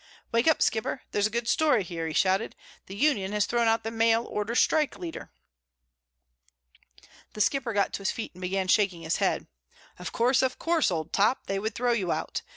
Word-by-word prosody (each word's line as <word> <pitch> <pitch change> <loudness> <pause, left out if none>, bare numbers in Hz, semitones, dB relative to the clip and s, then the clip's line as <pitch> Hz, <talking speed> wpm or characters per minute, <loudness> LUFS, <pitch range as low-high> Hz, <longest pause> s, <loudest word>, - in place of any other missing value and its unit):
"Wake 230 +5 +2
up, 320 - +4
Skipper! 225 +4 -1
There's 205 0 +2
a - - -8
good 235 +1 -3
story 295 -9 +3
here!" 170 -2 -5
he 160 - -4
shouted. 190 +3 +1 0.3
"The 195 - -8
union 205 -6 +1
has 210 -1 +2
thrown 235 +1 +1
out 225 0 +2
the 225 - -4
mail 225 +1 +2
order 210 +3 -3
strike 305 +2 +2
leader!" 340 -2 -7 2.0
The 210 - -3
Skipper 255 +3 +1
got 205 -2 0
to - - -1
his 195 - 0
feet 225 - -5
and 180 - -14
began 185 +1 -1
shaking 185 -4 +2
his 160 - 0
head. - - 0 0.5
"Of 180 - -6
course, 250 +3 +2
of 260 -1 0
course, 330 -5 +1
Old 160 -3 -4
Top, 210 +6 +2
they 195 0 -2
would 220 +3 -3
throw 245 0 +1
you 200 -7 0
out. - - -3
220 Hz, 200 wpm, -27 LUFS, 195-240 Hz, 2.0 s, up